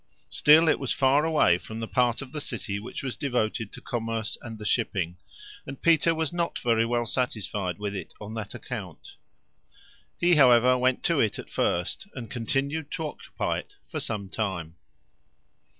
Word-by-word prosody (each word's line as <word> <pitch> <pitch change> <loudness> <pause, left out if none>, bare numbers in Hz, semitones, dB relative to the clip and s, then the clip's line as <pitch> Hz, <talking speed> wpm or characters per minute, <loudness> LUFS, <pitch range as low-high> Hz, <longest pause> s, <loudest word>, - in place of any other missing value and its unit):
Still 155 +2 +6
it 155 - +3
was 135 - -2
far 140 +3 +3
away 150 - +4
from 110 +3 -8
the 115 - -3
part 125 0 +1
of 130 - -12
the 150 0 -4
city 100 -6 -3
which 110 +6 -7
was 130 -5 -3
devoted 110 -5 -1
to - - -10
commerce 115 -1 -3
and 115 -2 -7
the 105 - -8
shipping, 95 -6 0 0.5
and 135 0 -7
Peter 165 0 +4
was 160 0 -1
not 170 -1 -1
very 115 -1 +2
well 120 0 0
satisfied 105 -6 -2
with 105 -1 -3
it 95 -4 -7
on 105 +1 -7
that 110 -2 -5
account. - - -8 1.0
He, 175 -1 +4
however, 125 -2 +6
went 125 0 +1
to 170 -4 +2
it 110 -5 +2
at - - -9
first, 90 - -1
and 115 -5 -7
continued 140 +7 -1
to 160 - -2
occupy 150 - -3
it - - -13
for - - -5
some 100 -3 -2
time. 95 -6 -3
120 Hz, 175 wpm, -27 LUFS, 105-140 Hz, 1.0 s, Still